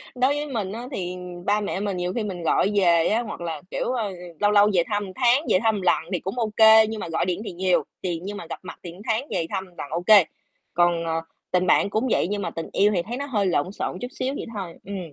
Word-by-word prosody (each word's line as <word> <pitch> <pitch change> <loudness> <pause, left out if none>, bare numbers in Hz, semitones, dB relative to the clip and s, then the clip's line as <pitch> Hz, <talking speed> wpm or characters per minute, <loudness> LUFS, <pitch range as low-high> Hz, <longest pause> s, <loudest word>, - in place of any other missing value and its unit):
đối 255 +3 +3
với 295 +1 -3
mình 215 -8 -3
á, 235 +3 -6
thì 180 -6 -4 0.3
ba 210 +1 +2
mẹ 200 -1 -2
mình 200 -2 -2
nhiều 180 +1 -2
khi 230 - -1
mình 180 -4 -5
gọi 190 +5 +2
về 170 -4 +4
á 225 +3 +2
hoặc 215 -6 -7
là, 165 -3 -4
kiểu, - - -1
ơ, 230 -5 -1
ừ, 185 - -8 0.2
lâu 205 0 +3
lâu 205 0 +6
về 175 - +4
thăm 205 -1 -1
một 190 - -8
tháng, 250 +1 +4
về 185 - +4
thăm 220 -1 +3
một 200 - -3
lần 180 - +3
thì 180 - +1
cũng 195 +9 -4
ô 220 -2 0
kê, 220 0 +8
nhưng 220 0 -4
mà - - -4
gọi 165 - 0
điện 180 +2 -2
thì - - -4
nhiều, 180 +1 +1 0.2
thì 175 -3 -2
nhưng 205 +1 -5
mà - - -7
gặp - - -5
mặt 185 - -9
thì 175 - -7
một 180 +4 -13
tháng 225 +5 0
về 165 - 0
thăm 190 -1 -3
lần 175 -5 -9
ô 170 +2 -2
kê. 200 0 +7 0.5
Còn, 175 -1 +2
ờ, 165 0 -1 0.3
tình 180 0 +2
bạn 200 - +4
cũng 220 +5 0
vậy - - +2
nhưng 205 +1 -2
mà - - -2
tình 165 - -6
yêu 205 +1 +4
thì 175 - +2
thấy 240 +6 -5
nó 280 - -3
hơi 215 -8 0
lộn 180 0 +1
xộn 180 - -4
chút 245 - -3
xíu 260 +1 -3
vậy - - -5
thôi, 185 -5 -5
ừm. 200 0 -5
200 Hz, 290 wpm, -24 LUFS, 175-220 Hz, 0.5 s, kê